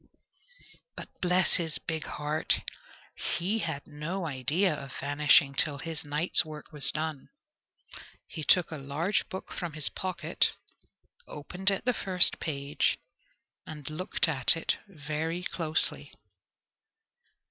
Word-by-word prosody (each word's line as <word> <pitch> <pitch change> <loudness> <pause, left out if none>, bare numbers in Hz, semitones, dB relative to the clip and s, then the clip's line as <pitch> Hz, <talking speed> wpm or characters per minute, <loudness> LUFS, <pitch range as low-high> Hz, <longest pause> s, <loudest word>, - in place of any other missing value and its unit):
But - - -8
bless 180 0 +3
his 165 -3 +1
big 160 -1 -4
heart! 150 +1 -1 0.8
he 190 +6 +1
had 160 -7 -3
no 165 +5 -4
idea 155 +6 +1
of 140 -3 -7
vanishing 145 0 +4
till 145 +1 +3
his 160 +1 -5
night's 150 +5 +2
work 155 -2 -10
was 140 -3 +2
done. 155 -2 -4 1.0
He 160 - -6
took 180 +2 +4
a 160 - -4
large 150 +8 -1
book 190 - -7
from 175 -4 -4
his 155 -1 +1
pocket, 185 -2 0 0.7
opened 180 +6 -2
at 195 +3 -1
the 250 - +3
first 185 -5 +3
page, 140 -2 0 0.7
and 150 -3 -8
looked 180 +3 0
at 145 0 +4
it 165 - 0
very 160 0 -3
closely. 160 -4 +1
155 Hz, 125 wpm, -29 LUFS, 145-180 Hz, 1.0 s, vanishing